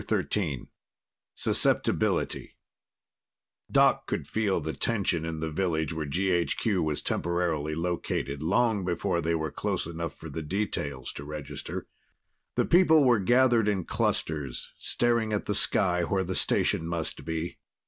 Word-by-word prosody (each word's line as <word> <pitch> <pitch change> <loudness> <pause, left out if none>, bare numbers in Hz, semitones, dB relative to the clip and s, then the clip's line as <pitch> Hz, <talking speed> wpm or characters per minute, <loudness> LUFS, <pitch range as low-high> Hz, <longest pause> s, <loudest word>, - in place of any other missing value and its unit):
XIII 80 -11 -1 0.7
Susceptibility - - +1 1.1
Doc - - +4
could - - -2
feel 105 -2 +1
the 80 0 -4
tension 95 -8 0
in 80 -1 -4
the 80 -1 -2
village 80 -2 0
where 80 -2 -3
GHQ 90 - +1
was 75 -2 -1
temporarily 80 -3 -1
located 80 -4 -2
long 100 +4 +2
before 90 0 0
they 85 +1 +1
were 80 -2 -2
close - - -2
enough 85 0 -5
for 80 - -10
details 75 -4 -3
to 70 - -7
register. 75 -1 -6 0.7
The - - +2
people 165 -4 +6
were 120 -4 +5
gathered 120 +1 +4
in 95 -5 0
clusters, 70 -5 -1
staring 115 -2 +1
at 105 - -1
the 105 - 0
sky 90 -3 +2
where 95 +2 0
the 95 +1 -3
station 80 - +1
must 85 -1 -3
be. 80 +1 -4
85 Hz, 135 wpm, -28 LUFS, 80-100 Hz, 1.1 s, people